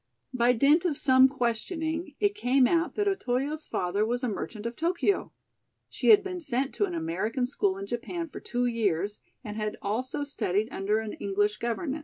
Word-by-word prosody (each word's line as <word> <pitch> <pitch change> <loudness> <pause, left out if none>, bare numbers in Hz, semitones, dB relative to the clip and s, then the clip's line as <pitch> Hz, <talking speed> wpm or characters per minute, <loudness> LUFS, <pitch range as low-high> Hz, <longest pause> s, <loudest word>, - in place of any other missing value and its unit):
By 245 0 +4
dint 285 +8 +4
of 325 -6 0
some 260 -1 +6
questioning, 315 - -2
it 410 -1 +2
came 265 -9 +3
out 335 +5 +1
that 410 -1 0
Otoyo's 300 -5 -1
father 185 +3 0
was 245 +3 -1
a - - +1
merchant 215 0 -5
of 235 +1 -3
Tokio. 350 +5 0 0.6
She - - -3
had 415 -2 +8
been 365 -2 -5
sent 270 -2 -1
to 410 - +1
an 360 -3 -5
American 280 -7 -1
school 200 -7 0
in 195 - -5
Japan 245 - -4
for - - -9
two 245 0 -2
years 205 -4 0 0.2
and 210 -2 -6
had 215 -1 -3
also 245 +7 -2
studied 220 -6 -1
under 205 0 0
an 220 -1 -3
English 205 +1 0
governess. 265 +6 -2
250 Hz, 185 wpm, -28 LUFS, 215-320 Hz, 0.6 s, had